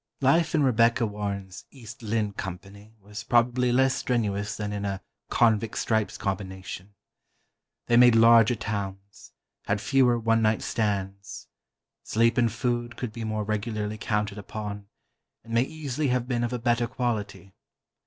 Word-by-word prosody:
Life 160 Hz, +5 st, +3 dB
in 150 Hz, -, +3 dB
Rebecca 120 Hz, -1 st, +3 dB
Warren's 100 Hz, -2 st, -5 dB
"East 120 Hz, -4 st, -12 dB
Lynne" 110 Hz, -2 st, -1 dB
Company 100 Hz, +4 st, -8 dB
was 105 Hz, +2 st, -9 dB
probably 120 Hz, +1 st, +2 dB
less 130 Hz, +1 st, +3 dB
strenuous 105 Hz, -5 st, -1 dB
than 105 Hz, -1 st, -4 dB
in 100 Hz, 0 st, -4 dB
a 100 Hz, -1 st, -2 dB, 0.3 s
"Convict 115 Hz, -2 st, +2 dB
Stripes" 110 Hz, -2 st, 0 dB
combination. 95 Hz, 0 st, -5 dB, 0.9 s
They 120 Hz, -, +3 dB
made 120 Hz, -1 st, +7 dB
larger 115 Hz, +1 st, +6 dB
towns, 100 Hz, -2 st, -6 dB, 0.3 s
had 100 Hz, 0 st, 0 dB
fewer 125 Hz, +1 st, +3 dB
one 115 Hz, 0 st, +2 dB
night 110 Hz, 0 st, +1 dB
stands. 100 Hz, -3 st, -3 dB, 0.5 s
Sleep 115 Hz, +2 st, +2 dB
and 120 Hz, -2 st, +2 dB
food 120 Hz, +1 st, -2 dB
could 120 Hz, -4 st, -5 dB
be 115 Hz, -, -6 dB
more 110 Hz, -1 st, -2 dB
regularly 105 Hz, 0 st, -3 dB
counted 105 Hz, -1 st, -2 dB
upon, 105 Hz, 0 st, -6 dB, 0.6 s
and 115 Hz, 0 st, -9 dB
may 115 Hz, -, +4 dB
easily 145 Hz, 0 st, -3 dB
have 125 Hz, -1 st, 0 dB
been 120 Hz, -2 st, -1 dB
of 120 Hz, -, -1 dB
a 125 Hz, -, -1 dB
better 120 Hz, 0 st, +1 dB
quality. 110 Hz, -6 st, -3 dB
110 Hz, 145 wpm, -26 LUFS, 100-120 Hz, 0.9 s, made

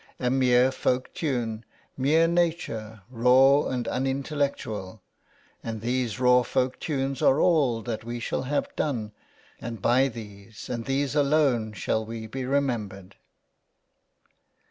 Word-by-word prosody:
A 125 Hz, -1 st, 0 dB
mere 130 Hz, -1 st, +4 dB
folk 130 Hz, -1 st, -1 dB
tune, 120 Hz, -7 st, -2 dB, 0.3 s
mere 155 Hz, +5 st, +3 dB
nature, 160 Hz, -, -1 dB
raw 130 Hz, +4 st, +5 dB
and 125 Hz, -2 st, -3 dB
unintellectual; 135 Hz, -7 st, -2 dB, 0.6 s
and 110 Hz, -2 st, -5 dB
these 120 Hz, -2 st, -1 dB
raw 125 Hz, 0 st, +5 dB
folk 125 Hz, +1 st, -1 dB
tunes 135 Hz, -3 st, -2 dB
are 135 Hz, -, +4 dB
all 140 Hz, -11 st, +2 dB
that 115 Hz, -3 st, -4 dB
we 120 Hz, +1 st, -5 dB
shall 120 Hz, -, -2 dB
have 140 Hz, +3 st, -2 dB
done: 115 Hz, -8 st, -2 dB, 0.5 s
and 115 Hz, -1 st, -6 dB
by 125 Hz, +7 st, +3 dB
these, 105 Hz, -2 st, -10 dB
and 115 Hz, -2 st, -4 dB
these 135 Hz, 0 st, -1 dB
alone, 140 Hz, -7 st, +2 dB
shall 110 Hz, +1 st, -1 dB
we 110 Hz, 0 st, -7 dB
be 130 Hz, +4 st, -5 dB
remembered." 110 Hz, -9 st, -2 dB
125 Hz, 125 wpm, -26 LUFS, 115-135 Hz, 0.6 s, raw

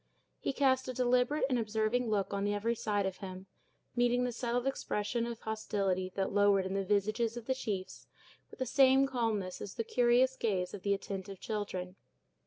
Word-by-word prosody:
He -, -, -1 dB
cast 260 Hz, -1 st, +2 dB
a 255 Hz, -, -3 dB
deliberate 250 Hz, +4 st, +2 dB
and 255 Hz, -3 st, +1 dB
observing 220 Hz, +2 st, 0 dB
look 205 Hz, -2 st, 0 dB
on 200 Hz, 0 st, 0 dB
every 205 Hz, +3 st, 0 dB
side 210 Hz, -3 st, -1 dB
of 190 Hz, -1 st, -3 dB
him, 185 Hz, -1 st, -8 dB, 0.5 s
meeting 245 Hz, 0 st, +3 dB
the 250 Hz, -, 0 dB
settled 240 Hz, +1 st, -1 dB
expression 235 Hz, -3 st, -1 dB
of 235 Hz, -1 st, -6 dB
hostility 195 Hz, -4 st, -1 dB
that 195 Hz, -1 st, -1 dB
lowered 200 Hz, -1 st, +4 dB
in 190 Hz, -, -3 dB
the 195 Hz, 0 st, 0 dB
visages 215 Hz, +4 st, 0 dB
of 235 Hz, -, -7 dB
the 260 Hz, -, +1 dB
chiefs 205 Hz, -7 st, -5 dB, 0.4 s
with -, -, -13 dB
the 260 Hz, -, -1 dB
same 265 Hz, +1 st, +5 dB
calmness 225 Hz, -8 st, -1 dB
as 195 Hz, -, -6 dB
the 230 Hz, -, -1 dB
curious 245 Hz, +3 st, +3 dB
gaze 185 Hz, -7 st, -1 dB
of 205 Hz, -, -6 dB
the 200 Hz, +1 st, +2 dB
attentive 195 Hz, -1 st, -6 dB
children. 190 Hz, -4 st, -4 dB
220 Hz, 185 wpm, -32 LUFS, 195-245 Hz, 0.5 s, same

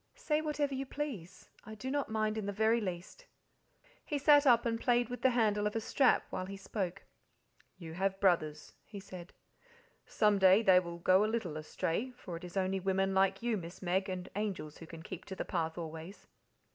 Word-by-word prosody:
"Say 310 Hz, -12 st, 0 dB
whatever 300 Hz, -2 st, -1 dB
you 270 Hz, 0 st, -3 dB
please, 215 Hz, -, -6 dB, 0.2 s
I 220 Hz, +1 st, -9 dB
do 260 Hz, +5 st, -5 dB
not 285 Hz, 0 st, -1 dB
mind 215 Hz, -1 st, 0 dB
in 215 Hz, -2 st, -3 dB
the -, -, -1 dB
very 220 Hz, +3 st, +2 dB
least." 185 Hz, -, -6 dB, 0.8 s
He 295 Hz, -, -2 dB
sat 290 Hz, 0 st, +5 dB
up 235 Hz, -2 st, +5 dB
and 230 Hz, -1 st, -1 dB
played 240 Hz, -2 st, +2 dB
with 245 Hz, -, -6 dB
the 260 Hz, -, +5 dB
handle 210 Hz, -4 st, +2 dB
of 210 Hz, -, -4 dB
a -, -, +1 dB
strap 255 Hz, +4 st, +2 dB
while 185 Hz, -, -3 dB
he 195 Hz, 0 st, -7 dB
spoke. 195 Hz, -2 st, -4 dB, 0.7 s
"You 165 Hz, -3 st, -9 dB
have 195 Hz, +2 st, -1 dB
brothers," 155 Hz, -6 st, +1 dB
he 205 Hz, -, -9 dB
said; 185 Hz, -2 st, -10 dB, 0.8 s
"some 210 Hz, -2 st, +2 dB
day 190 Hz, +3 st, +6 dB
they 185 Hz, -3 st, +7 dB
will 170 Hz, -1 st, -6 dB
go 185 Hz, +3 st, +4 dB
a 215 Hz, -, +1 dB
little 200 Hz, -9 st, -2 dB
astray 165 Hz, +8 st, -2 dB
for 180 Hz, -7 st, -7 dB
it 165 Hz, -, -8 dB
is 180 Hz, +2 st, -7 dB
only 190 Hz, 0 st, 0 dB
women 195 Hz, +1 st, 0 dB
like 195 Hz, +2 st, +2 dB
you, 235 Hz, -2 st, +1 dB
Miss 175 Hz, +1 st, -9 dB
Meg, 190 Hz, +2 st, 0 dB
and 185 Hz, -1 st, -4 dB
angels 195 Hz, -8 st, -4 dB
who 165 Hz, -, -10 dB
can 165 Hz, -1 st, -10 dB
keep 185 Hz, -, -8 dB
to 190 Hz, -, -7 dB
the -, -, -4 dB
path 165 Hz, -2 st, -2 dB
always. 165 Hz, +3 st, -8 dB
195 Hz, 205 wpm, -33 LUFS, 180-230 Hz, 0.8 s, they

